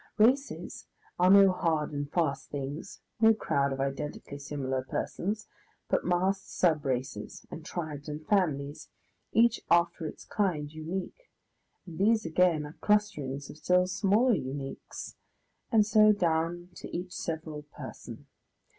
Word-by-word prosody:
Races 255 +6 +1 0.3
are 180 +1 +5
no 195 0 +8
hard 160 -4 0
and 145 0 -3
fast 160 -6 0
things, 145 +6 -6 0.2
no 225 0 +6
crowd 140 -9 0
of 135 - -3
identically 140 +1 -4
similar 135 -2 -2
persons, 205 +10 -3 0.4
but - - +2
massed 185 +2 0
sub 160 -5 +3
races, 125 -5 -3
and 160 - -7
tribes 155 -3 -5
and 150 +1 -6
families, 150 -9 0 0.4
each 230 0 +4
after 170 -1 +3
its - - -9
kind 160 -8 -1
unique, 180 - -5 0.6
and 165 -4 -9
these 215 +1 +3
again 165 -2 +3
are 150 - -10
clusterings 145 -10 +1
of - - -13
still 180 +3 +3
smaller 205 +6 +3
uniques 135 -4 -5 0.6
and 220 -3 +5
so 215 0 +6
down 175 -2 0
to - - -7
each 180 +1 -5
several 160 -3 -4
person. 150 0 -10
165 Hz, 135 wpm, -30 LUFS, 145-195 Hz, 0.6 s, no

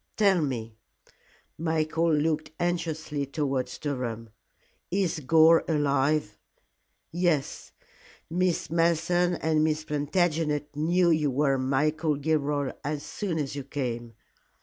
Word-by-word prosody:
Tell 200 -5 +4
me" 115 -6 -4 0.8
Michael 160 0 +1
looked 155 +1 0
anxiously 160 -4 -2
towards 140 -2 -2
Durham 120 -6 -4 0.6
"is 185 -4 0
Gore 160 +3 +5
alive?" 145 -5 +1 0.7
"Yes. 170 -4 -1 0.6
Miss 175 -2 0
Malleson 170 +1 +2
and 155 -1 +1
Miss 155 0 0
Plantagenet 150 -1 -1
knew 170 +3 +2
you 155 -2 +2
were 135 0 +1
Michael 150 +4 +1
Gilroy 145 -2 0
as 145 0 -3
soon 190 -6 -3
as 145 -3 -3
you 140 - -4
came." 120 -4 -4
155 Hz, 105 wpm, -27 LUFS, 140-165 Hz, 0.8 s, Gore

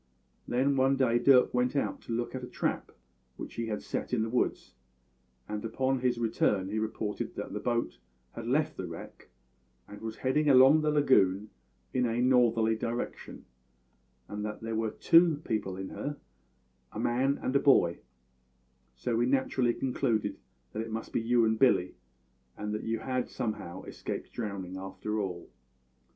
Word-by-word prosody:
Then 135 +3 +1
one 135 +1 +4
day 125 -3 +2
Dirk 125 0 +5
went 125 +2 +1
out 140 - -1
to - - -9
look 120 +1 -2
at 130 -1 -5
a - - -5
trap - - -2 0.5
which - - -7
he 115 -1 -3
had 105 -2 -3
set - - -4
in 115 -3 +2
the 110 - -3
woods, 125 - -1 0.7
and 105 0 -4
upon 130 +4 0
his 125 -1 +1
return 105 -4 +1
he 110 +2 -1
reported 110 -1 -3
that - - -5
the - - -3
boat 120 - -1 0.3
had 115 0 -7
left 145 +5 +1
the 95 - -4
wreck 85 0 -10 0.6
and 105 0 -11
was 110 0 -5
heading 145 +3 +1
along 135 +3 +7
the 155 - +1
lagoon 105 -9 +3 0.4
in 125 -1 +2
a 115 +1 -1
northerly 120 -3 +3
direction, 115 +2 -5 0.8
and 105 0 -5
that 105 0 -5
there 115 0 -3
were 110 0 0
two 165 +6 +5
people 100 -4 -2
in 95 0 -5
her 145 0 -5 0.7
a - - -6
man 130 +4 +1
and 130 - -2
a - - +6
boy; 90 - +4 1.0
so 115 - -2
we 120 +2 +2
naturally 130 -2 +2
concluded 125 -4 -1 0.3
that 110 - -2
it 115 - -5
must 110 0 -5
be - - +1
you 115 0 +3
and 110 0 +1
Billy, 90 -9 +3 0.6
and 105 0 -4
that 105 - -2
you 115 0 0
had 130 -1 -2
somehow 105 -6 -4
escaped - - -6
drowning 100 -5 -5
after 95 +3 -4
all." 90 -4 -4
115 Hz, 170 wpm, -30 LUFS, 105-130 Hz, 1.0 s, along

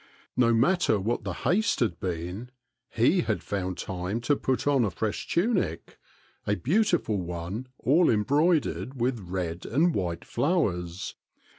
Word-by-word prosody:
No 125 -2 +4
matter 120 - +3
what 110 +4 -1
the 100 -3 -3
haste 215 +5 +2
had 100 -8 0
been, 90 +6 -4 0.5
6e 160 +10 +3
had 110 - -1
found 95 -2 -3
time 95 +4 -3
to 145 +4 +2
put 130 -1 -1
on 140 -3 +3
a 105 - +1
fresh 105 +4 -3
tunic, 180 - 0 0.5
a 105 - +2
beautiful 175 - +1
one 90 +7 -5
all 155 +8 +3
em 105 -2 +3
broidered 145 -3 +1
with 120 0 0
red 90 -2 -4
and 160 +7 +2
white 85 -3 -2
flowers. 90 - -1
115 Hz, 145 wpm, -27 LUFS, 90-145 Hz, 0.5 s, No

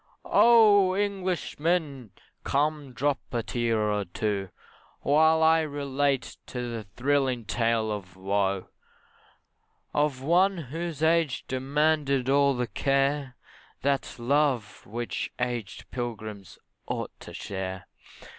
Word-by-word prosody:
Oh! 205 -5 +6
Englishmen, 175 - -1 0.3
come 145 -1 0
drop 140 +3 0
a 120 -2 -1
tear 115 -1 0
or 105 -1 0
two, 100 +1 -2 0.5
While 160 +2 +4
I 160 +1 +6
relate 140 -2 -1 0.2
a 120 -2 -3
thrilling 130 -3 +1
tale 115 -1 +1
of 95 -3 -6
woe, 95 0 -1 1.2
Of 145 -3 0
one 185 +5 +3
whose 165 +1 -5
age 160 -3 +2
demanded 140 0 +1
all 140 -1 +4
the 125 0 0
care 135 +4 0 0.5
That 140 0 0
love 125 -4 0
which 120 +3 -3
aged 120 -4 -4
pilgrims 110 -5 -6 0.3
ought - - -3
to - - -10
share. 95 -1 -5
135 Hz, 105 wpm, -27 LUFS, 115-150 Hz, 1.2 s, Oh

